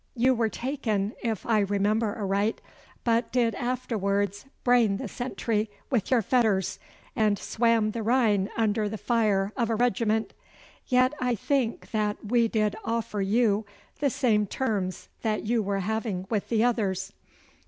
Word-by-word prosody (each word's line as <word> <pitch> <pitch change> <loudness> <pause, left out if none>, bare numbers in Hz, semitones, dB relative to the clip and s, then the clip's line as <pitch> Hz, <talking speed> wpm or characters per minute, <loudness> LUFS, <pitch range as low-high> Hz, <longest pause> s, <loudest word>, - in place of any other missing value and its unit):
You 255 +2 +4
were 230 -2 +1
taken, 220 -6 -2
if 225 -4 -2
I 225 -2 +3
remember 205 +2 +1
aright, 200 +1 0 0.4
but 230 0 +1
did 235 -2 +2
afterwards 205 -4 -1 0.2
brain 235 -5 +4
the 255 - -5
sentry 225 -2 -2 0.2
with 235 -7 +1
your 245 -4 +3
fetters, 215 -4 +1 0.4
and 215 -3 +2
swam 230 0 +1
the 230 - -4
Rhine 220 -4 +2
under 215 -1 +1
the 220 - -4
fire 210 -4 +1
of 235 -3 0
a 225 - +1
regiment. 220 -1 +1 0.5
Yet, 255 +2 +3
I 250 -1 +1
think 245 +1 -1
that 210 -2 0
we 235 +2 +3
did 215 -2 0
offer 225 -2 -2
you 210 +1 +2 0.4
the 285 - +2
same 215 -5 +2
terms 200 -6 -2
that 215 -1 -1
you 230 +1 +2
were 200 -1 -1
having 215 -2 -2
with 210 -3 -1
the 225 -1 +2
others. 195 -5 0
220 Hz, 150 wpm, -27 LUFS, 205-235 Hz, 0.5 s, You